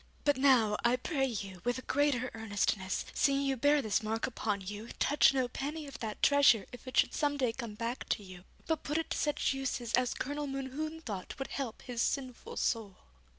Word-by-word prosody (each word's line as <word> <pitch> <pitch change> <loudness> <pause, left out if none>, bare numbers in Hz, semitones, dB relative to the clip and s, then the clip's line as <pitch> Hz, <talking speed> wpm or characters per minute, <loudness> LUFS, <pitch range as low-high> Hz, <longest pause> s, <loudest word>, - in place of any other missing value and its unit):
But 290 -1 +4
now, 250 -6 +4
I 240 +1 +4
pray 270 +1 0
you, 195 -6 -5
with 245 0 0
a 255 - -7
greater 270 -4 +1
earnestness, 205 -3 -1
seeing 275 -1 +2
you 270 -1 +1
bear 285 +3 +3
this 210 -3 +1
mark 220 +1 -1
upon 210 -5 -2
you, 205 +4 -6
touch 290 - +5
no 260 -2 +1
penny 295 +5 -4
of 280 - -9
that 220 -2 -5
treasure 280 -8 +6
if 245 +1 -11
it 255 - -4
should - - +4
some 290 -1 +1
day 250 -4 +1
come 230 -4 -6
back 235 +3 -4
to 210 - 0
you, 185 -2 -11 0.2
but 320 -1 0
put 295 +2 -1
it 325 - -2
to - - 0
such 295 -1 +1
uses 255 -3 -3
as 250 0 +2
Colonel 290 +2 -3
Mohune 275 +4 -4
thought 200 -8 -5
would 270 - -4
help 260 -5 -4
his 240 -2 -3
sinful 255 -2 -2
soul.' 215 -5 -1
250 Hz, 205 wpm, -32 LUFS, 220-280 Hz, 0.2 s, treasure